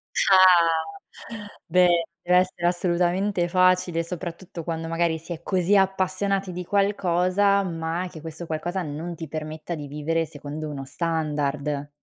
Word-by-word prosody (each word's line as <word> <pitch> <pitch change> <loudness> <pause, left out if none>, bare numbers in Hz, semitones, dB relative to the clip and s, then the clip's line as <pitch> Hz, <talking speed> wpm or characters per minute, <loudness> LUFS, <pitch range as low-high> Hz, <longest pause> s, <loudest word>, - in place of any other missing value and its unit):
Ah 175 +1 +4 0.6
beh, 175 -1 +4 0.2
dev'essere 180 -1 +2
assolutamente 175 +1 +1
facile, 185 -2 +2
soprattutto 175 0 -7
quando 165 -1 -4
magari 165 0 0
si 165 +2 -7
è 165 - -9
così 185 +2 +1
appassionati 190 0 +1
di 180 +1 -5
qualcosa, 200 0 +2
ma 165 +1 -3
che 160 -4 -10
questo 165 +1 -7
qualcosa 175 +4 -3
non 160 +3 -5
ti 160 -1 -7
permetta 155 +2 -5
di 145 -2 -7
vivere 160 +3 -1
secondo 150 +1 -7
uno 135 -2 -6
standard. 150 -2 -2
170 Hz, 130 wpm, -24 LUFS, 160-185 Hz, 0.6 s, Ah